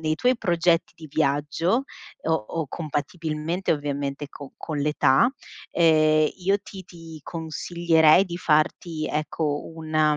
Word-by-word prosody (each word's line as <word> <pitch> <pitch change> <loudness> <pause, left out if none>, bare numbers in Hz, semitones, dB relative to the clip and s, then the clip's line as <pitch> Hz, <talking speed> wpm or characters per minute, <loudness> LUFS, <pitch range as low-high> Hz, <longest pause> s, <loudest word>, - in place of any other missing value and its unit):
nei 155 -1 0
tuoi 250 +9 +2
progetti 170 -4 +1
di 160 -2 -11
viaggio, 150 - +1 0.4
o 160 - 0
o 160 +3 -2
compatibilmente 160 +3 -2
ovviamente 145 -1 -3
co 140 -1 -11
con 155 -3 -5
l'età. 145 - +3 0.4
Ehm, 155 -2 +4
io 195 +2 +1
ti 190 -3 -10
ti 165 -3 -12
consiglierei 165 +1 +2
di 175 -2 -6
farti, 155 0 0
ecco 150 0 -2
una 155 -1 +1
160 Hz, 125 wpm, -24 LUFS, 150-170 Hz, 0.4 s, Ehm